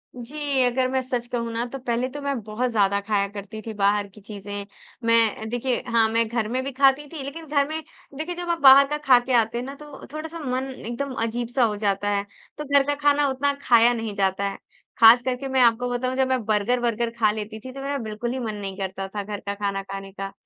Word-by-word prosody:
जी। 275 +2 -1
अगर 255 +1 +2
मैं 260 0 0
सच 250 -2 -3
कहूँ 235 -2 -3
ना 235 +1 -1
तो - - -3
पहले 245 0 -1
तो 290 +2 -7
मैं 280 -3 -2
बहुत 220 +4 -2
ज़्यादा 200 -2 +2
ख़ाया 200 -2 +1
करती 205 +2 -8
थी 220 +1 -7
बाहर 205 0 +1
की 200 +2 -17
चीज़ें। 205 -1 -7 0.4
मैं 230 -1 +4
अ, 220 - -7
देखिए 245 +1 -1
हाँ, 230 -1 +3
मैं 230 0 +1
घर 230 -2 -1
में 255 +3 -1
भी 275 - -4
खाती 275 +2 +3
थी 290 -4 -5
लेकिन 320 +4 -7
घर 285 -1 +2
में 315 +1 -3 0.4
देखिए 340 +3 -4
जब 350 0 -5
आप 335 -1 0
बाहर 275 0 +9
का 300 +1 -2
खाके 255 -3 +3
आते 225 +1 -1
हैं 245 - -3
ना 275 +1 -7
तो 295 -1 -12
थोड़ा-सा 320 +2 -6
मन 260 -1 -3
एकदम 255 +3 -5
अजीब-सा 240 +2 -1
हो 215 -2 +1
जाता 205 -1 0
है। 200 -1 0 0.3
तो 300 - -4
घर 280 0 +4
का 290 - +1
ख़ाना 290 0 +3
उतना 280 +2 0
ख़ाया 235 0 +5
नहीं 225 -3 -4
जाता 195 0 0
है। - - -7 0.4
ख़ास 230 +2 +9
करके 260 +1 -2
मैं 260 -1 +3
आपको 245 +1 +3
बताऊँ 255 +1 -1
जब 265 0 +2
मैं 260 -3 0
बर्गर-वर्गर 235 +2 +1
ख़ा 215 -2 +4
लेती 215 0 -6
थी 255 +3 -9
तो 275 - -7
मेरा 280 +1 -2
बिल्कुल 220 +3 -4
ही 260 - -3
मन 220 -3 -3
नहीं 195 -1 -6
करता 195 0 -4
था 205 +1 -5
घर 205 0 -5
का 200 - -2
खाना 200 -1 -2
खाने 195 0 -8
का 195 0 -6
240 Hz, 240 wpm, -24 LUFS, 210-270 Hz, 0.4 s, बाहर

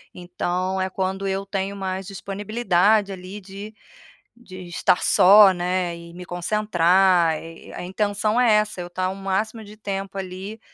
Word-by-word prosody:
então 180 +1 -2
é 190 - -1
quando 190 +1 -3
eu 195 +1 -2
tenho 195 0 -3
mais 190 -1 -4
disponibilidade 200 0 +1
ali 190 +2 -8
de 200 +3 -10 0.7
de 185 -5 -11
estar 175 +1 +1
só, 200 +1 +7
né, 180 -1 -2
e 170 0 -12
me 180 +1 -9
concentrar. 180 -3 +2
E 165 0 -12
a - - -6
intenção 205 +4 0
é 235 -3 +5
essa, 210 -2 +1
eu 175 - -6
tá 185 +1 -2
o 190 - -5
máximo 195 +4 -2
de 210 0 -13
tempo 195 -2 -5
ali, 195 +3 -6
190 Hz, 155 wpm, -23 LUFS, 180-205 Hz, 0.7 s, só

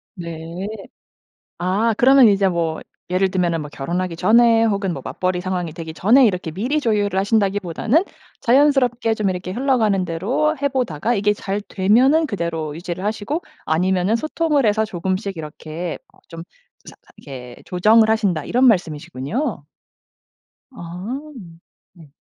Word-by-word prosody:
네. 170 +1 -6 0.9
아 200 +6 +1
그러면 260 0 +6
이제 200 -1 +3
뭐 165 -3 -2 0.3
예를 185 +1 +1
들면은 175 -3 0
뭐 150 - -8
결혼하기 170 +4 -3
전에 230 +3 +4
혹은 200 -4 0
뭐 - - -6
맞벌이 185 -1 -2
상황이 180 -3 -3
되기 160 -1 -8
전에 240 +10 +5
이렇게 180 -5 -2
미리 240 - -1
조율을 205 -6 0
하신다기보다는 205 - +1 0.4
자연스럽게 250 -3 +3
좀 210 -3 0
이렇게 180 0 -5
흘러가는 225 -6 +1
대로 200 - 0
해 280 - +1
보다가 240 - -1
이게 210 -1 +2
잘 205 0 -4
되면은 255 +12 +3
그대로 170 - -3
유지를 175 +1 -6
하시고 220 +9 -2 0.2
아니면은 185 +5 +1
소통을 305 +1 0
해서 215 +1 +2
조금씩 190 0 -3
이렇게 160 +2 -6 0.2
어 - - -24
좀 165 0 -8 0.4
사 - - -12 0.2
이렇게 125 -4 -10
조정을 215 +5 +4
하신다 200 -9 +1
이런 250 +2 +1
말씀이시군요. 175 - -2 1.1
아. 185 +4 -6 0.7
네. 160 -6 -18
195 Hz, 320 characters per minute, -20 LUFS, 170-230 Hz, 1.1 s, 그러면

